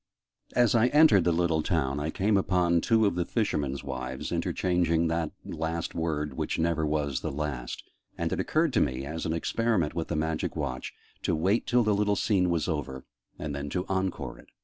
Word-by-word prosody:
As 120 -3 +4
I 115 0 +4
entered 150 - +6
the 85 - +4
little 85 -1 +1
town, 70 -2 0
I 75 +2 -2
came 100 +5 +1
upon 90 -3 +2
two 110 +2 +3
of 100 - +2
the 90 0 0
fishermen's 75 - -1
wives 65 -1 -5
interchanging 85 -2 +1
that 80 -1 0 0.2
last 80 +1 -3
word 75 -3 -2
"which - - -2
never 80 -1 +1
was 75 -3 0
the - - -3
last": 70 -4 -4 0.3
and - - -1
it - - -2
occurred - - +1
to - - +3
me, 65 +1 -1
as 80 +3 -4
an 80 - 0
experiment 95 -1 0
with 85 -2 -3
the 85 - -2
Magic 80 0 -1
Watch, 65 0 -3 0.3
to - - 0
wait 95 +8 +1
till 120 0 +4
the 105 -1 +2
little 105 0 +2
scene 95 -3 +2
was 85 -2 0
over, 70 -5 -3 0.3
and 75 -2 -4
then 70 0 -4
to 90 +5 -2
'encore' 95 -1 -2
it. - - -16
80 Hz, 195 wpm, -28 LUFS, 75-95 Hz, 0.3 s, entered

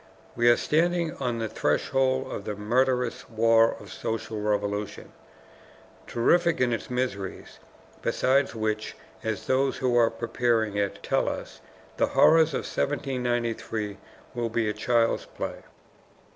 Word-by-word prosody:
We 120 0 +4
are 120 - +6
standing 170 +1 +1
on 125 -3 -2
the 115 -1 -2
threshold 130 +4 0
of - - -5
the 105 - -3
murderous 125 +3 0
war 115 0 +4
of - - -11
social 110 -1 -4
revolution, 105 0 -2 1.0
terrific 170 +8 +2
in 125 -2 +2
its 115 - -4
miseries, 125 -7 -4 0.4
beside 135 +2 +2
which, 110 -1 -2 0.3
as 110 -2 -3
those 135 +1 +1
who 125 -2 +1
are 115 -1 +5
preparing 115 -3 0
it 100 -1 -2
tell - - +1
us, - - -7 0.4
the - - +3
horrors 160 -2 +6
of - - -1
1793 120 -6 -2 0.4
will 120 -2 -2
be 110 -1 0
child's 115 +2 +1
play. - - -6
120 Hz, 130 wpm, -26 LUFS, 110-130 Hz, 1.0 s, are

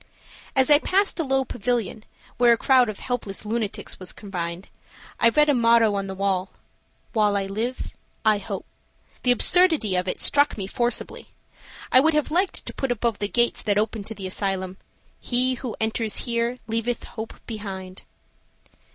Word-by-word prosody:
As 265 +2 +3
I 290 - +8
passed 390 +3 0
a - - +1
low 270 -2 0
pavilion, 225 -2 -3 0.4
where 240 -1 +6
a - - 0
crowd 255 -1 +4
of 210 - -6
helpless 225 -5 -4
lunatics 215 -1 -3
were 185 - -8
confined, 180 -3 -6 0.5
I 230 - +5
read 300 +5 +3
a 290 - +4
motto 230 -3 +4
on 195 -1 -2
the 190 - -6
wall, 190 -1 -1 0.6
"While 210 -3 +2
I 195 - -1
live 225 +6 -4 0.3
I 215 -1 +4
hope." 195 - -6 0.6
The 250 - 0
absurdity 295 - +6
of 180 +1 -1
it - - -3
struck 285 -3 +2
me 195 - -4
forcibly. 240 +5 -3 0.6
I 255 - +7
would 315 +3 +3
have 300 0 0
liked 365 +4 0
to - - -7
put 270 -2 -2
above 235 -2 -1
the 205 - 0
gates 240 +3 +1
that 205 -2 0
open 215 0 -1
to 225 - -6
the 195 - -7
asylum, 190 -1 -2 0.4
"He 255 +1 0
who 245 -2 -6
enters 220 -1 -1
here 235 0 -1
leaveth 230 +1 -2
hope 220 -1 -8
behind." 190 -4 -7
225 Hz, 170 wpm, -24 LUFS, 200-250 Hz, 0.6 s, I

